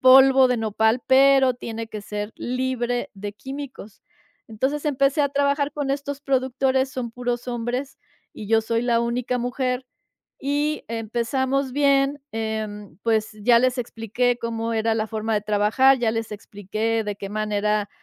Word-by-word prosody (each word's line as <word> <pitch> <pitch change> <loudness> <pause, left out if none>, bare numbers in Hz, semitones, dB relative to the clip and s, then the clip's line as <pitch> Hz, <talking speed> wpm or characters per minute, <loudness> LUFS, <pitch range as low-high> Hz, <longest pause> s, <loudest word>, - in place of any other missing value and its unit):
polvo 265 0 +7
de 250 - +1
Nopal, 220 +2 +1
pero 265 0 +6
tiene 230 -2 -6
que 215 - -6
ser 210 +1 -5
libre 245 -1 -2
de 205 +1 -6
químicos. 265 -4 -9 0.5
Entonces 265 +7 -2
empecé 275 +1 +2
a 285 - +3
trabajar 280 +1 +1
con 285 -2 -2
estos 280 0 -3
productores, 265 0 +1
son 250 -3 -4
puros 245 0 -3
hombres 245 +3 -3 0.3
y 210 - -8
yo 225 0 +4
soy 230 +1 0
la 240 -1 +2
única 240 +1 -1
mujer, 250 +1 -2 0.6
y 290 +2 -1
empezamos 245 +4 -1
bien, 280 0 +2
em, 215 -4 -4
pues 220 -1 +1
ya 235 +2 +6
les 255 +1 +2
expliqué 240 +1 -1
cómo 230 0 -2
era 225 0 +1
la 220 0 -1
forma 220 0 -2
de 210 - +1
trabajar, 215 +6 +3
ya 235 -2 +1
les 225 -1 -3
expliqué 215 +2 -3
de 205 -1 -4
qué 200 -1 -6
manera 210 0 0
240 Hz, 155 wpm, -23 LUFS, 220-265 Hz, 0.6 s, polvo